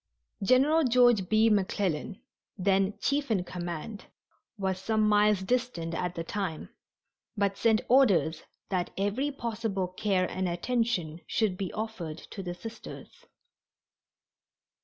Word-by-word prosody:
General 275 +9 +4
George 245 -6 +4
B. 220 +1 +4
McClellan, 195 -3 0 0.4
then 195 +1 +1
chief 280 -1 0
in 200 -5 +1
command, 175 +4 -6 0.5
was 190 -2 -1
some 215 +2 +1
miles 210 -1 +4
distant 230 -8 -1
at 180 +1 -2
the 165 - -3
time, 180 -3 -4 0.7
but 200 -1 +1
sent 220 0 +3
orders 220 -11 +4 0.3
that 180 -2 -1
every 205 +9 0
possible 225 -7 -2
care 185 -1 0
and 185 -1 -2
attention 175 -4 -1
should 215 -5 +1
be 190 -1 -4
offered 210 -8 -5
to 195 - -6
the 175 -2 -5
Sisters. 225 +5 -10
200 Hz, 120 wpm, -29 LUFS, 180-225 Hz, 0.7 s, General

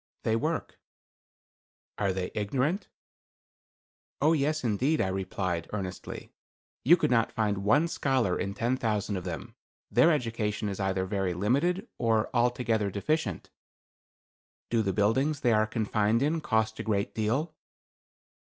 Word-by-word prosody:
"They 110 - +1
work." 155 +7 -2 1.2
"Are 100 -2 +2
they 95 -1 -3
ignorant?" 135 - -1 1.3
"Oh, 155 +3 +4
yes, 155 0 0
indeed;" 125 +7 +1
I 95 - +1
replied, 95 -2 -2
earnestly. 95 -3 -6 0.5
"You 170 +7 +7
could 165 - 0
not 115 -2 +3
find 105 -3 0
one 145 +12 +3
scholar 130 - +1
in 100 +1 -3
ten 120 +3 0
thousand 105 -4 -1
of 90 -1 -4
them. 80 -6 -6 0.4
Their 170 - +5
education 115 -6 -1
is 100 - -5
either 95 -1 0
very 95 -2 -1
limited, 150 - +1
or 115 -2 +1
altogether 120 -3 +1
deficient." 155 +12 -2 1.2
"Do 115 - +3
the 100 -3 0
buildings 130 +9 +1
they 120 -3 +3
are 110 0 +3
confined 110 +1 +1
in 160 +3 +1
cost 110 -6 0
a - - -2
great 100 -2 -1
deal?" 125 +9 -1
110 Hz, 135 wpm, -29 LUFS, 100-135 Hz, 1.3 s, You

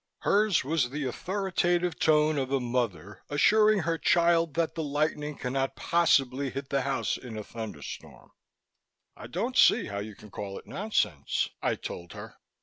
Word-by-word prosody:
Hers 205 -3 +3
was 140 -3 0
the 145 +3 -4
authoritative 175 +3 -1
tone 150 -1 +3
of 135 0 -3
a 135 - +2
mother 115 -7 -3
assuring 210 +7 +4
her 165 0 -1
child 170 -3 +3
that 165 -1 0
the 165 - -3
lightning 150 0 -1
cannot 135 +1 -2
possibly 140 -5 +2
hit 135 +1 -6
the 140 -1 +1
house 135 +1 -1
in 120 -4 -8
a 105 - -5
thunderstorm. 110 -11 -8 0.8
"I - - -10
don't - - -3
see - - +5
how 100 0 -4
you 105 0 -7
can 105 0 -15
call 100 -1 -6
it - - -11
nonsense," 190 - -1
I - - +1
told 85 -1 -8
her. - - -10
140 Hz, 160 wpm, -28 LUFS, 125-170 Hz, 0.8 s, see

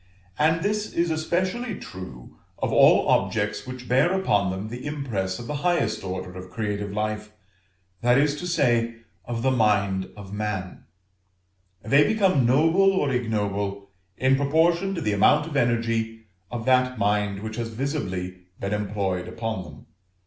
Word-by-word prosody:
And 160 +2 +3
this 210 +1 -1
is 170 0 +1
especially 185 +8 -1
true 90 - -10 0.2
of - - -2
all - - +6
objects - - +1
which 125 -1 -8
bear 135 +8 +3
upon 100 - +2
them 95 +3 -4
the 120 +2 -7
impress 110 -11 -2
of 120 - -8
the 150 +4 -3
highest 170 - 0
order 95 -1 -5
of 90 0 -8
creative 105 0 -3
life, 105 0 -3 0.7
that 120 +1 +4
is 145 +1 +3
to 180 - -5
say, 120 -8 +2 0.3
of 115 -1 -4
the 130 - +3
mind 100 -5 +1
of 100 -1 -9
man: 105 -3 -4 1.0
they 140 +6 +5
become 190 - +3
noble 165 +9 +4
or 145 -7 +1
ignoble 100 -4 -2 0.3
in 130 +1 +3
proportion 170 +7 +2
to 170 - -3
the 105 -7 0
amount 150 +9 +4
of 160 - -7
the 140 - +3
energy 115 -1 -1 0.3
of 120 -2 -5
that 125 -1 +3
mind 100 -1 0
which 110 0 -5
has 115 -1 -3
visibly 95 - -4
been 100 +1 -2
employed 100 -3 -2
upon 115 -4 -4
them. 75 -4 -13
115 Hz, 155 wpm, -25 LUFS, 100-145 Hz, 1.0 s, all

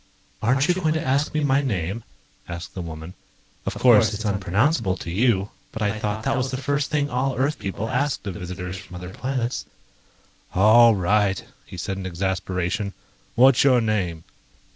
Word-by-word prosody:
"Aren't 135 +6 +2
you 180 - +4
going 165 -4 0
to 160 0 -2
ask 140 +3 +1
me 155 -1 -1
my 140 0 +3
name?" 100 - -2 0.5
asked 85 +1 -7
the 95 - -5
woman. 80 +1 -7 0.5
"Of - - -2
course, 110 -3 +5
it's 110 +2 -5
unpronounceable 100 - +1
to 85 - -6
you, 100 0 +1 0.2
but 110 - -4
I 105 +1 -1
thought 105 0 -2
that - - +1
was 130 +1 -1
the 130 - -3
first 145 +1 -1
thing 145 -1 +1
all 130 +2 0
Earth 145 +4 0
people 100 +3 -4
asked 130 0 -1
of 100 - -3
visitors 90 0 -6
from 90 -1 -11
other 90 +1 -7
planets." 125 +1 -3 0.9
"All 110 +4 +7
right," 100 0 +1 0.2
he - - -9
said 95 +2 -3
in 95 - -4
exasperation. 95 +2 -2 0.4
"What's 130 +1 +6
your 130 -3 +5
name?" 95 -8 -1
105 Hz, 175 wpm, -23 LUFS, 95-130 Hz, 0.9 s, All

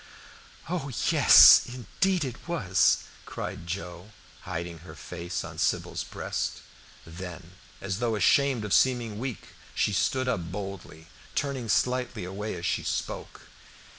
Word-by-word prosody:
"Oh, 165 -4 -3 0.2
yes - - +9
indeed 145 - -1
it 125 +4 -8
was!" 100 - +2 0.2
cried 85 - -6
Joe, 90 +2 -6 0.4
hiding 85 -1 -5
her 85 - -12
face 85 -1 -5
on - - -9
Sybil's - - -1
breast. - - -4 0.4
Then, 90 0 -9 0.3
as 100 0 -4
though 120 -2 0
ashamed 125 +3 +3
of 105 - -2
seeming 120 -5 +2
weak, 125 -4 -5 0.3
she 105 - +1
stood 130 +5 0
up 90 -9 -2
boldly, 95 -5 -7 0.3
turning 135 -5 -2
slightly 125 -1 0
away 100 +3 -5
as 85 0 -6
she - - 0
spoke. - - -4
105 Hz, 130 wpm, -27 LUFS, 90-125 Hz, 0.4 s, yes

